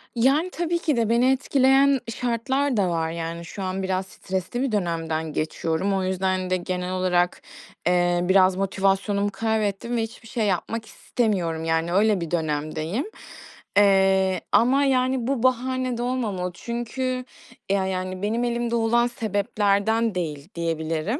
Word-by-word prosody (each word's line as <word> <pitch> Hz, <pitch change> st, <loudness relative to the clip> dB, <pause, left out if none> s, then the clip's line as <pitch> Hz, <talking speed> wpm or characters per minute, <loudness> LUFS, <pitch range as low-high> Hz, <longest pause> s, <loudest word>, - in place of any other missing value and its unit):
Yani, 275 Hz, +9 st, +3 dB
tabii 345 Hz, -1 st, -1 dB
ki 305 Hz, -6 st, 0 dB
de 225 Hz, -2 st, +1 dB
beni 240 Hz, +3 st, +4 dB
etkileyen 270 Hz, +1 st, +3 dB, 0.2 s
şartlar 250 Hz, +2 st, 0 dB
da 195 Hz, -3 st, +2 dB
var. 165 Hz, -1 st, -1 dB
Yani, 170 Hz, 0 st, -5 dB
şu 195 Hz, +3 st, -7 dB
an 190 Hz, +1 st, -2 dB
biraz 190 Hz, 0 st, -1 dB
stresli 190 Hz, +6 st, -4 dB
bir 270 Hz, -2 st, 0 dB
dönemden 165 Hz, -5 st, -2 dB
geçiyorum. 160 Hz, +5 st, -1 dB
O 190 Hz, -1 st, 0 dB
yüzden 185 Hz, 0 st, -1 dB
de 185 Hz, -, +2 dB
genel 180 Hz, 0 st, -3 dB
olarak, 180 Hz, -1 st, +1 dB, 0.5 s
ııı, 175 Hz, 0 st, +2 dB
biraz 190 Hz, -1 st, +5 dB
motivasyonumu 195 Hz, +1 st, +1 dB
kaybettim 220 Hz, +2 st, -1 dB
ve -, -, +1 dB
hiçbir 225 Hz, 0 st, -9 dB
şey 230 Hz, -2 st, -1 dB
yapmak 215 Hz, +4 st, -1 dB
istemiyorum. 180 Hz, -12 st, -1 dB
Yani, 165 Hz, +1 st, 0 dB
öyle 205 Hz, 0 st, +3 dB
bir 165 Hz, -, -5 dB
dönemdeyim, 155 Hz, -, -2 dB, 0.7 s
ııı, 190 Hz, -1 st, +4 dB
ama, 265 Hz, +4 st, +4 dB
yani, 255 Hz, -2 st, +1 dB
bu 265 Hz, -3 st, -1 dB
bahane 255 Hz, 0 st, +1 dB
de -, -, -3 dB
olmamalı. 220 Hz, -8 st, -2 dB
Çünkü 250 Hz, +4 st, -3 dB, 0.5 s
ya 195 Hz, -1 st, +2 dB
yani, 185 Hz, 0 st, -3 dB
benim 220 Hz, +4 st, 0 dB
elimde 235 Hz, -1 st, -1 dB
olan 235 Hz, +1 st, +3 dB
sebeplerden 210 Hz, 0 st, 0 dB
değil, 155 Hz, -3 st, -4 dB
diyebilirim. 165 Hz, -, -2 dB
200 Hz, 145 wpm, -24 LUFS, 180-240 Hz, 0.7 s, biraz